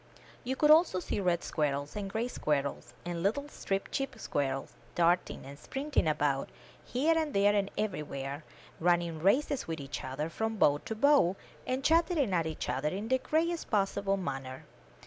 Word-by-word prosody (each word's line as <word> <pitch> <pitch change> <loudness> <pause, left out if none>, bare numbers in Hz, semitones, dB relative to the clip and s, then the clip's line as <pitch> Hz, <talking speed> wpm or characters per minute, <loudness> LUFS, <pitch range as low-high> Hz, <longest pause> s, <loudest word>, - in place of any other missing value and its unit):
You 260 +2 -2
could 300 +2 +5
also 315 - +5
see 180 - -3
red 175 -3 +1
squirrels, 145 -2 -1
and 200 -2 -3
gray 225 +4 -1
squirrels, 145 - -2
and 175 -1 -3
little 225 +10 0
striped 195 -8 -3
chip 270 -2 -2
squirrels, 135 -8 -2 0.2
darting 175 +1 +1
and 140 +1 -10
springing 275 - -1
about, 145 -3 +1 0.3
here 300 +7 +1
and 315 -3 -1
there 200 +1 +5
and 200 -1 +1
everywhere, 150 -8 -3 0.4
running 170 -1 +1
races 260 - +2
with 165 -1 -3
each 140 0 -6
other 135 +4 -3
from 220 +6 -2
bough 145 -6 +4
to 220 - -3
bough, 270 -7 +4 0.3
and 260 +1 -1
chatter 335 +3 +3
ing 255 -10 +1
at 165 -2 +1
each 160 - -4
other 145 +3 0
in 200 +6 -4
the 260 0 +3
gayest 325 +5 0
possible 195 -1 +1
manner. 135 -7 -5
195 Hz, 170 wpm, -31 LUFS, -, 0.4 s, could